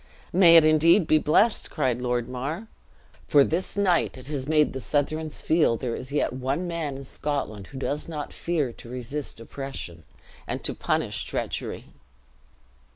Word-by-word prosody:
"May 170 -2 +8
it 160 - +7
indeed 160 +4 +5
be 155 0 +4
blessed!" 205 +10 +3
cried 130 -5 0
Lord 120 -1 -1
Mar; 140 - -4 0.6
"for 145 -2 +6
this 170 +7 -2
night 185 -8 +2
it 130 - -11
has 140 -3 -3
made 150 -1 +3
the 130 - -4
Southrons 155 +3 -2
feel 155 -8 +3
there 120 -2 -3
is 130 +2 -7
yet 145 -3 0
one 135 +7 -2
man 160 -5 -3
in 140 - -8
Scotland 135 -8 -4
who 135 - -10
does 145 +2 -2
not 150 -3 -5
fear 155 -8 -1
to 120 - -13
resist 130 +2 -5
oppression, 115 - -7 0.4
and - - -4
to - - -1
punish - - -1
treachery." - - -4
145 Hz, 160 wpm, -26 LUFS, 130-160 Hz, 0.6 s, May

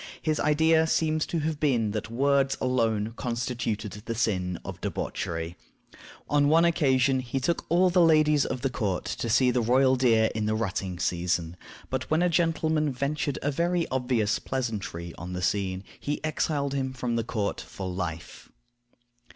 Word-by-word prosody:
His 155 -1 -1
idea 160 +2 +3
seems 155 -1 +1
to 165 - -1
have 155 0 -2
been 120 -8 +1
that 110 +1 -4
words 135 +2 +2
alone 115 -4 0
constituted 120 -4 -3
the 115 - -3
sin 90 -6 0
of - - -7
debauchery. 80 0 -3 0.7
On 145 -1 +3
one 165 +3 +5
occasion 135 -5 +3
he 130 +1 -3
took 170 +6 -1
all 180 +2 +4
the 180 0 +4
ladies 155 -3 +5
of 125 - -3
the 135 0 -1
court 100 -7 -2
to 115 - -3
see 125 +2 +4
the 125 0 +1
royal 130 +3 +4
deer 115 -3 +3
in 110 -1 -1
the 110 - +1
rutting 95 -4 -2
season; 85 -1 -1 0.4
but 130 0 -3
when 160 +3 +2
a 180 - +3
gentleman 160 -3 +1
ventured 140 +2 -2
a 145 - +1
very 170 +3 0
obvious 125 -5 0
pleasantry 105 -10 -4
on 90 +1 -6
the 90 - -3
scene, 95 -1 -1 0.2
he 145 +1 -3
exiled 145 -2 -1
him 130 -1 -2
from 120 -2 -2
court 105 -2 -2
for 95 - -7
life. 85 -3 -5
130 Hz, 165 wpm, -27 LUFS, 105-150 Hz, 0.7 s, one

